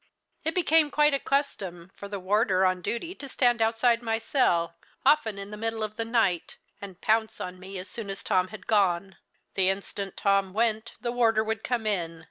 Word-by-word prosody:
It 320 0 -1
became 325 -3 +4
quite 295 0 +3
a 275 - +2
custom 195 -12 -2
for 200 - -8
the 200 0 -5
warder 190 0 +2
on 185 -1 +1
duty 235 - -3
to 280 -7 -9
stand 245 -3 +2
outside 230 +1 +3
my 225 -1 0
cell, 175 - +1 0.3
often 265 -8 +3
in 200 +1 -7
the 210 - -6
middle 225 0 -2
of 215 0 -4
the 225 - -2
night, 225 -7 0 0.2
and 190 -3 -9
pounce 220 0 +1
on 180 0 -6
me 190 +1 -8
as 185 +1 -6
soon 220 -1 -5
as 195 - -5
Tom 185 -3 +2
had 190 0 -11
gone. 190 -3 +1 0.4
The 190 -1 +3
instant 195 0 -4
Tom 195 -2 +2
went, 220 +1 0
the 240 - -2
warder 225 -3 +3
would 220 -1 -3
come 240 -3 -1
in. 170 -6 -1
215 Hz, 200 wpm, -27 LUFS, 190-235 Hz, 0.4 s, became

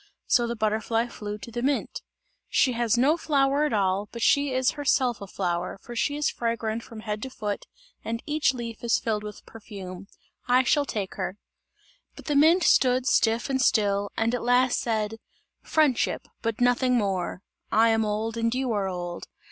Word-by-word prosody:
So 240 -2 +3
the 235 - -3
butterfly 220 +1 0
flew 210 -2 -6
to 210 +3 -10
the 240 +1 -3
mint. 275 +2 -1 0.5
"She 260 - +3
has 235 -1 +1
no 285 +7 +3
flower 280 -2 +2
at 300 - -1
all, 200 0 0
but 235 -1 -5
she 285 -2 +3
is 255 -1 +2
herself 265 -5 +1
a 200 - -7
flower, 180 -1 -2
for 240 - -9
she 285 +5 0
is 295 0 0
fragrant 230 -1 -2
from 225 -1 -10
head 210 -1 -4
to 265 - -5
foot 210 -5 -4 0.4
and 230 +1 -4
each 305 0 +2
leaf 235 -3 -7
is 235 - +3
filled 215 -2 -1
with 210 0 -9
perfume. 195 -4 -9 0.4
I 250 +1 +4
shall 285 +3 +2
take 205 -7 -4
her!" 190 - -3 0.8
But - - -12
the 295 - -1
mint 325 +5 +5
stood 255 -3 +4
stiff 230 -3 +2
and 265 -1 0
still, 205 -5 +2
and 225 +1 +1
at 245 - -1
last 245 +1 +3
said: 220 -1 -1 0.4
"Friendship 300 -6 +1
but 230 +1 -2
nothing 245 +1 +3
more! 190 -3 -2 0.3
I 225 +2 +5
am 225 0 +2
old 215 +2 -2
and 230 +1 0
you 260 -1 -1
are 200 -3 0
old! 175 -2 -5
230 Hz, 185 wpm, -26 LUFS, 210-255 Hz, 0.8 s, mint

